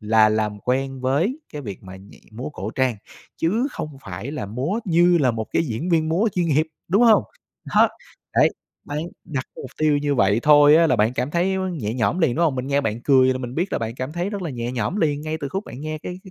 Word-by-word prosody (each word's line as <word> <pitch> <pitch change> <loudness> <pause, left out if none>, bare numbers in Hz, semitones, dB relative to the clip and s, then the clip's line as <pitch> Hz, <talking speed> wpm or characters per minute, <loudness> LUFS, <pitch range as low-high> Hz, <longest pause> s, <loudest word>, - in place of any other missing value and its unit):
Là 110 0 +4
làm 105 -1 -1
quen 135 +1 -1
với 160 - 0
cái 150 - -6
việc 100 -6 -7
mà 95 0 -10
nhảy 95 +2 -16
múa 120 +4 -5
cổ 110 -7 -5
trang, 130 -3 0 0.4
chứ 215 +11 +1
không 150 -3 -6
phải 100 +6 -6
là 145 -9 -4
múa 135 - -2
như 175 -1 +4
là 135 -5 +3
một 110 -2 -4
cái - - +2
diễn 125 +7 -3
viên 160 -2 +2
múa 190 +8 +2
chuyên 175 -2 +1
nghiệp, 155 +1 +2 0.2
đúng 200 +7 +3
hông? 225 -3 +6 0.5
Đó, - - +6 0.5
đấy, - - +5 0.4
bạn 145 - -4 0.3
đặt 140 -6 -4
mục 130 - -8
tiêu 155 -2 +3
như 145 0 0
vậy 100 -2 +3
thôi 145 0 +7
á, 165 0 +5
là 125 - +2
bạn 110 +2 +2
cảm 125 +3 -2
thấy 180 +4 +1 0.2
nhẹ 115 -10 -3
nhõm 130 +8 0
liền, 145 -8 +2
đúng 170 - +3
không? 150 -5 +1
Mình 125 - -3
nghe 140 +1 +1
bạn 110 -3 -2
cười 130 -2 +5
là 130 - -4
mình 125 0 -6
biết 180 +4 -1
là - - +1
bạn 115 0 -4
cảm 130 +4 -5
thấy 175 +3 -2
rất 200 -3 -4
là 165 - -3
nhẹ 120 -1 -4
nhõm 125 - -2
liền 150 -6 +1
ngay 155 +1 -3
từ 140 - -3
khúc 195 +7 -4
bạn 125 - -9
nghe 155 +1 -4
cái 180 +3 -7
cái 190 - -12
140 Hz, 255 wpm, -22 LUFS, 120-165 Hz, 0.5 s, thôi